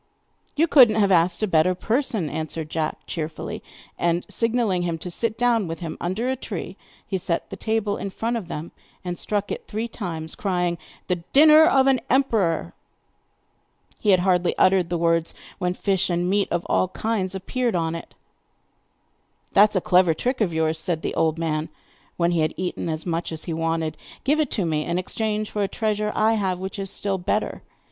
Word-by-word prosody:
'You 310 +3 +4
could 270 -8 +7
not 215 0 0
have 200 -1 +3
asked 175 +3 +3
a - - +2
better 180 +1 +3
person,' 230 - 0
answered 155 +1 -4
Jack 160 -1 -3
cheerfully. 155 -1 -5 0.4
And 170 0 +1
signing 230 +1 0 0.2
to 175 - -1
him 165 -1 -2
to 175 +2 -6
sit 225 +4 -2
down 235 -4 +2
with 165 +2 -6
him 165 -2 -4
under 190 +8 -1
a 260 - +1
tree, 195 -7 -6 0.3
he 190 - -2
set 170 -1 -2
the - - -4
table 215 0 -1
in 200 - -4
front 230 +5 -2
of 220 -7 -4
them, 165 0 -6 0.3
and 175 -1 -4
struck 205 -1 -2
it - - -5
three 220 +2 -3
times, 165 -8 -5
crying: 180 -3 -1 0.3
'The 180 - 0 0.2
dinner 310 +2 +8
of 270 -4 +4
an 270 -2 +4
emperor!' 205 - +1 1.3
He 210 - 0
had 185 -2 +5
hardly 180 -1 +2
uttered 185 -2 +4
the 175 - 0
words 165 0 +1 0.2
when 180 -1 -1
fish 195 -2 0
and 175 0 0
meat 200 +1 +2
of 175 0 -1
all - - +2
kinds 195 -1 -2
appeared 235 +4 -1
on 165 -1 0
it! 165 - -8 1.4
'That 210 +2 +7
is 210 - -11
a 185 - +2
clever 180 -2 +4
trick 250 - -1
of 195 -5 +2
yours,' 160 0 0
said 165 -2 -2
the - - -2
old 160 0 +1
man, 160 -1 -1 0.5
when 170 0 +2
he 170 - +1
had 155 0 0
eaten 180 -2 -3
as 155 0 -3
much 170 -1 -2
as 160 -1 -6
he 170 - -4
wanted. 165 -1 -1 0.3
'Give 295 +4 +2
it 300 -4 +1
to 195 - -1
me 155 -2 0
in 170 +2 -1
exchange 215 +3 -2
for 210 - -2
a 200 - +2
treasure 210 0 -1
I 220 +1 +3
have 190 -4 0
which 190 +2 -6
is 195 -1 -4
still 195 0 -2
better. 210 +4 -1
185 Hz, 200 wpm, -24 LUFS, 165-215 Hz, 1.4 s, dinner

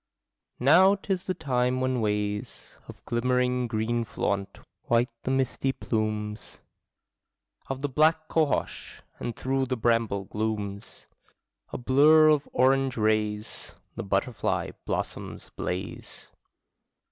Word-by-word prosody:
Now 180 +10 +6
'tis 195 -2 -3
the 185 - -2
time 125 -5 0
when 130 -1 0
ways 105 -1 -3
Of - - -13
glimmering 125 +1 +1
green 115 +1 -1
flaunt 100 -2 -3 0.3
white 120 +1 +2
the - - -4
misty 135 0 0
plumes 110 -3 -3 1.1
Of 135 0 -4
the 145 - 0
black 155 +3 +2
cohosh; 155 -3 -1 0.2
and 120 - -4
through 135 0 -1
bramble 115 -5 +1
glooms, 105 -1 -4 0.7
A - - -4
blur 150 +5 +6
of 150 -2 +2
orange 135 0 +2
rays, 105 -1 -1 0.2
The 115 - -5
butterfly 100 +3 -1 0.2
blossoms - - -4
blaze. 90 +1 -6
125 Hz, 110 wpm, -27 LUFS, 110-135 Hz, 1.1 s, Now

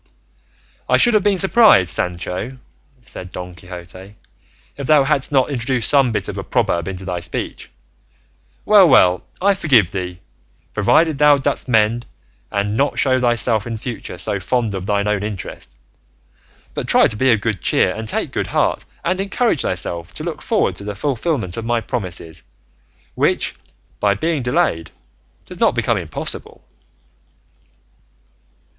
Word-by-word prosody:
"I - - +5
should 240 - +5
have 215 - +4
been 200 -1 +2
surprised, 195 - +5
Sancho," 90 +8 -3 0.4
said 90 -5 -9
Don 90 0 -8
Quixote, 90 +3 -11 0.6
"if 140 -2 -6
thou 150 -2 +5
hadst 145 0 0
not 135 0 +2
introduced 125 -2 0
some 135 -4 +4
bit 105 - -2
of - - -5
a - - -5
proverb 85 0 0
into 95 0 -6
thy 90 -2 -3
speech. 85 -2 -6 1.0
Well, 205 -4 +6
well, 90 - +4 0.2
I 200 +2 +3
forgive 130 - +3
thee, 90 -2 -5 0.5
provided 160 -4 +2
thou 150 -1 +6
dost 135 - -2
mend 115 0 +1 0.4
and 100 +1 -1
not 140 +4 0
show 130 -2 +2
thyself 120 -3 +3
in 115 -1 -4
future 110 -5 -7
so 100 +3 -1
fond 115 +2 -1
of 95 0 -5
thine 100 0 0
own 105 -1 0
interest, 95 - -7 1.0
but - - -4
try - - +5
to - - 0
be 130 +4 +2
of 115 - +3
good 105 -4 -2
cheer - - +2
and 110 0 -6
take - - -3
heart, - - 0 0.2
and 185 +2 0
encourage 200 - 0
thyself 85 -2 -3
to - - -5
look - - -5
forward - - 0
to - - -8
the 105 0 -5
fulfillment 125 - -2
of 115 - -4
my 120 0 +1
promises, 90 - -5 0.7
which, - - 0 0.5
by 100 -1 +2
being 160 +6 -1
delayed, 80 -9 0 0.6
does - - -11
not - - +3
become - - +1
impossible." - - -4
110 Hz, 150 wpm, -19 LUFS, 95-140 Hz, 1.0 s, Well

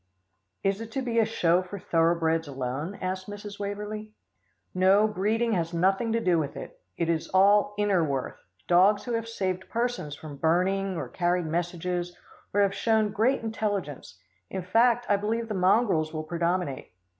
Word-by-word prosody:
"Is 195 +2 0
it 225 0 -7
to 270 - -2
be 235 -2 0
a 225 - +4
show 180 -5 +2
for 185 +2 -8
thoroughbreds 165 -2 +1
alone?" 135 +7 -4
asked 185 0 -3
Mrs. 205 0 -8
Waverlee. 210 +1 -5 0.6
"No, 190 +3 +4
breeding 215 +3 0
has 170 -4 -1
nothing 195 +6 +2
to 230 - +2
do 180 -6 +2
with 145 -3 -4
it. - - -9 0.2
It 170 - 0
is 165 -1 0
all 205 +2 +5
inner 205 -4 +2
worth 135 -4 -3 0.3
dogs 190 +4 +4
who 245 - -4
have 230 0 -2
saved 190 -4 -3
persons 235 -11 -2
from 145 -1 -10
burning 185 +4 +1
or - - -4
carried 175 -1 0
messages, 175 +2 -3 0.3
or 205 - +2
who - - +6
have 195 -1 +1
shown 220 0 +1
great 230 +5 +1
intelligence. 205 - -3 0.3
In 190 -1 -4
fact, 235 +6 +3
I 205 - +3
believe 225 +3 -2
the 215 - -3
mongrels 185 -4 +2
will 155 -1 -4
predominate." 170 - -2
190 Hz, 170 wpm, -27 LUFS, 170-215 Hz, 0.6 s, who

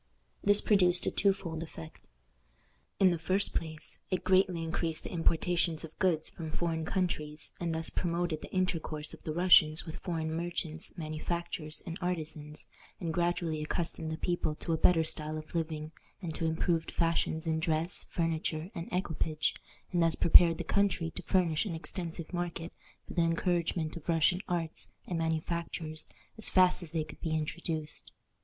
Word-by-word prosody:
This 205 0 +6
produced 180 -4 +4
a - - +1
two 200 - +3
fold 165 -5 -5
effect. 80 - -9 1.0
In 190 -2 +6
the 170 - -1
first 190 +4 +1
place, 160 -2 -2
it 185 -2 -1
greatly 185 -3 +3
increased 165 0 -1
the - - -6
importations 170 -1 +1
of 160 -1 -10
goods 165 -4 +2
from 160 -2 -7
foreign 160 0 -1
countries, 150 -5 -1
and 170 -2 -1
thus 160 0 -1
promoted 170 -2 -1
the - - -9
intercourse 165 -5 -1
of - - -11
the 155 - -4
Russians 165 -2 +6
with 160 0 -6
foreign 160 -3 -2
merchants, 170 +1 -2
manufacturers, 155 0 -3
and 165 - -5
artisans, 155 -4 -3 0.3
and 165 -2 -2
gradually 170 -2 0
accustomed 160 0 -2
the 160 - -3
people 175 -3 -1
to 165 - -2
a - - +4
better 165 0 +5
style 155 0 -3
of 155 0 -9
living, 155 -2 -2 0.3
and 170 -5 -4
to 165 - -2
improved 160 +1 +1
fashions 165 -1 0
in 160 -1 +1
dress, 160 +1 0
furniture, 165 +1 -1
and 170 -3 -5
equipage, 160 -4 0 0.4
and 175 - +2
thus 165 -1 +3
prepared 170 0 +7
the - - -3
country 195 -5 +1
to 185 - -6
furnish 175 0 +2
an 170 - -3
extensive 170 0 -5
market 175 -1 -3 0.3
for - - -7
the 175 - +2
encouragement 165 -1 0
of 170 0 -8
Russian 170 +2 +3
arts 165 -2 -2
and 175 -2 -2
manufactures 160 -1 -2 0.3
as 220 - +5
fast 185 -1 +5
as 175 - -6
they 160 0 -1
could 155 - -12
be 160 -1 -1
introduced. 155 0 -4
165 Hz, 165 wpm, -31 LUFS, 160-175 Hz, 1.0 s, prepared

